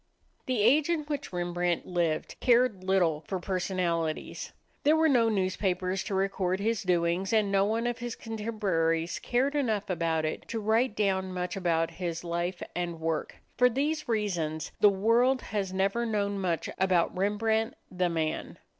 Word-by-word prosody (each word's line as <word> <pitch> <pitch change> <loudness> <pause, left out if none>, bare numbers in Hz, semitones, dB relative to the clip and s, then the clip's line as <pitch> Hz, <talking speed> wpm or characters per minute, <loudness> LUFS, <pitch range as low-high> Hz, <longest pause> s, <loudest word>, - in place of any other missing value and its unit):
The 250 -5 +1
age 285 +8 +4
in 335 -2 +1
which 290 -1 -4
Rembrandt 175 -1 -1
lived 170 -3 -1
cared 240 -6 +3
little 175 -5 +2
for 190 - -2
personalities. 175 -3 -2 0.3
There 300 +2 +4
were 320 0 +4
no 240 -6 +4
newspapers 185 -2 0
to 195 - -2
record 190 -1 0
his 220 0 0
doings, 180 +1 +1
and 215 -3 +2
no 195 0 +3
one 225 +3 0
of 240 0 -1
his 240 -1 -4
contemporaries 190 -7 -1
cared 260 +4 0
enough 220 -9 0
about 165 -2 0
it 155 - -4
to 230 - -3
write 220 +2 +1
down 190 -2 0
much 180 +1 -3
about 165 -3 0
his 170 -1 -4
life 175 +1 -2
and 175 -2 -3
work. 160 0 -2 0.2
For 250 0 +6
these 295 +4 -1
reasons, 175 -8 -1
the 205 - +7
world 230 +6 +2
has 200 -3 -2
never 195 +5 0
known 205 -3 -1
much 175 -4 -1
about 185 -3 +2
Rembrandt, 220 +3 0 0.2
the 180 -1 0
man. 160 -2 -2
195 Hz, 160 wpm, -29 LUFS, 175-225 Hz, 0.3 s, the